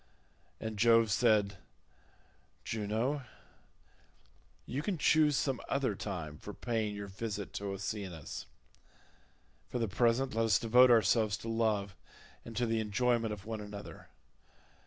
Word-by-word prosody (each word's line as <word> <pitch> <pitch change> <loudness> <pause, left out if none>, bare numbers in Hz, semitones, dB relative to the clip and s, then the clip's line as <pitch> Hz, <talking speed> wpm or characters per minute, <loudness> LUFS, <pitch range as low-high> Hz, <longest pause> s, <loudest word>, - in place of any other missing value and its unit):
And 110 -2 -5
Jove 115 -1 +5
said, 105 -3 +3 1.1
"Juno, 115 +6 -1 1.4
you 135 +4 -3
can 185 +3 -2
choose 150 -1 +4
some 135 -3 -1
other 135 -5 +1
time 85 -7 -5
for 105 - -8
paying 110 -4 -2
your 100 0 -5
visit 100 0 -5
to 100 +1 -4
Oceanus—for 95 -4 -5 1.3
the 115 -2 0
present 120 +6 +1
let 115 +1 +1
us 105 -5 +4
devote 125 +3 +6
ourselves 110 -1 +4
to - - -9
love 105 -4 0 0.5
and 115 - -9
to 120 - +2
the 115 -1 0
enjoyment 115 +1 +1
of 100 -2 -7
one 110 -1 -4
another. 105 0 -9
110 Hz, 125 wpm, -32 LUFS, 100-120 Hz, 1.4 s, devote